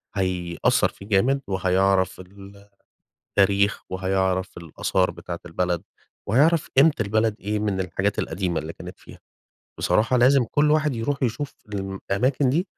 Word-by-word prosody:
هيأثر 95 +4 +1
فيه 100 - -14
جامد 120 +7 +2
وهيعرف 95 0 +1
ال 100 +2 -14 0.7
تاريخ 100 +1 +3
وهيعرف 95 0 -1
الآثار 85 +3 -1
بتاعة 85 -1 -7
البلد 85 0 -1 0.5
وهيعرف 150 +9 +3
قيمة 150 +4 +6
البلد 110 +1 +1
إيه 105 +1 -2
من 105 -2 -1
الحاجات 95 +2 -1
القديمة 85 -2 -2
اللي 80 +2 -7
كانت - - -11
فيها. - - -14 0.6
بصراحة 120 +4 +2
لازم 130 +1 +5
كل 145 +5 +1
واحد 150 -2 +2
يروح 135 +5 -2
يشوف 125 +3 -2 0.2
الم 95 -1 -4
أماكن 125 +6 +2
دي؛ 165 +7 +1
100 Hz, 135 wpm, -24 LUFS, 95-125 Hz, 0.7 s, قيمة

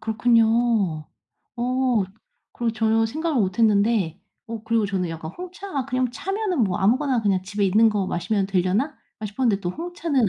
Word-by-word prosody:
그렇군요. 225 -6 +2 0.5
어 250 -2 +1 0.5
그리고 235 -1 -1
전혀 225 0 +2
생각을 310 +2 -1
못 190 -1 -1
했는데 210 -5 +2 0.3
어 230 -1 -6
그리고 225 -1 +1
저는 190 -3 -1
약간 160 -1 -6
홍차 365 +2 -8 0.2
'그냥 255 -2 0
차면은 390 - -2
뭐 185 -3 -1
아무거나 250 +4 +2
그냥 195 -3 +1
집에 205 +1 -2
있는 215 +4 +5
거 205 -3 -1
마시면 195 +3 -1
되려나?' 195 - 0 0.3
싶었는데 210 -1 0
또 175 - -2
홍차는 325 - -1
225 Hz, 340 characters per minute, -23 LUFS, 195-255 Hz, 0.5 s, 있는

